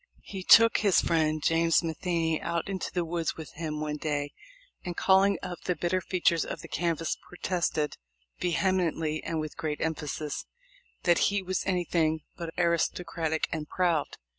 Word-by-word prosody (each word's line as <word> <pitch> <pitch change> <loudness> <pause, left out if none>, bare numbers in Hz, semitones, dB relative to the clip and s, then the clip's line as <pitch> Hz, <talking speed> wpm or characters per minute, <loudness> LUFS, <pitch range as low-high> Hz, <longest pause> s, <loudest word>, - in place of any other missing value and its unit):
He 195 -2 -7
took 230 +4 +7
his 200 -4 +4
friend 155 -2 +1
James 165 +1 +3
Matheney 165 0 -1
out 170 0 -2
into 195 -1 -3
the 175 -2 -1
woods 165 0 -2
with 160 -2 -8
him 155 -1 -4
one 150 0 -2
day 145 -1 -2 0.5
and, 175 -2 -5
calling 195 0 +4
up 175 -2 -6
the 180 - +1
bitter 175 +3 0
features 170 -3 +2
of - - -6
the - - -9
canvass, 165 -1 -1
protested 175 -4 -1 0.4
"vehemently 170 -3 0
and 165 - -2
with 155 -1 -5
great 150 -2 -3
emphasis" 150 -2 -3 0.6
that 175 -2 +4
he 200 -1 -1
was 185 0 -1
anything 170 -4 +1
but 170 -2 -5
aristocratic 170 -2 0
and 155 -2 -4
proud. 170 -5 0
165 Hz, 155 wpm, -28 LUFS, 155-180 Hz, 0.6 s, took